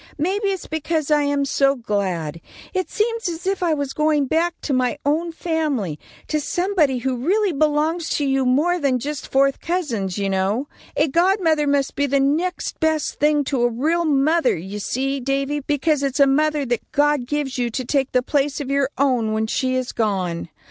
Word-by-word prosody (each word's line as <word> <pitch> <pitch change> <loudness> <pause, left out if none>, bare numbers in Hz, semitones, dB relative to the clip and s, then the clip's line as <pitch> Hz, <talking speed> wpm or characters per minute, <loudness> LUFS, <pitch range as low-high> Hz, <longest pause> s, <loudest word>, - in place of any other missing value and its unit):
Maybe 385 +7 0
it's 385 -2 -2
because 315 -1 -2
I 300 -1 +4
am 285 -1 +1
so 275 0 +2
glad. 185 - -2 0.3
It 370 -1 -1
seems 455 -2 -1
as 335 +1 -6
if 385 0 -1
I 335 -3 +2
was 285 -2 -3
going 305 -2 +2
back 330 +5 0
to 285 - -2
my 255 +2 +1
own 320 +4 +1
family; 300 - -2 0.3
to 305 -1 0
somebody 350 -4 +1
who 255 +1 -2
really 385 - +1
belongs 310 +2 +1
to 290 - 0
you 270 -1 +1
more 300 +8 +2
than 275 -4 +1
just 285 +3 -5
fourth 275 0 +3
cousins, 235 - -2
you 200 -1 -1
know. 195 +8 0 0.3
A 305 - +3
godmother 335 -1 +2
must 280 -1 +1
be 285 - +1
the 280 +1 +2
next 310 +7 -1
best 315 -2 0
thing 295 0 +3
to 270 -2 -1
a 240 - +3
real 310 +9 0
mother, 300 - +2
you 190 +5 -6
see, 270 +6 -1
Davy, 275 +2 -1
because 295 +1 0
it's 275 0 -1
a 280 - +7
mother 300 +1 +2
that 240 -2 -3
God 290 -3 +2
gives 280 -2 -2
you 240 -1 0
to 255 +2 -4
take 270 +1 0
the 250 -1 +2
place 285 +1 0
of 275 -2 -4
your 280 -1 +2
own, 250 -6 +1
when 220 0 0
she 255 +3 -1
is 255 -1 -2
gone. 185 -7 -1
285 Hz, 195 wpm, -21 LUFS, 255-315 Hz, 0.3 s, a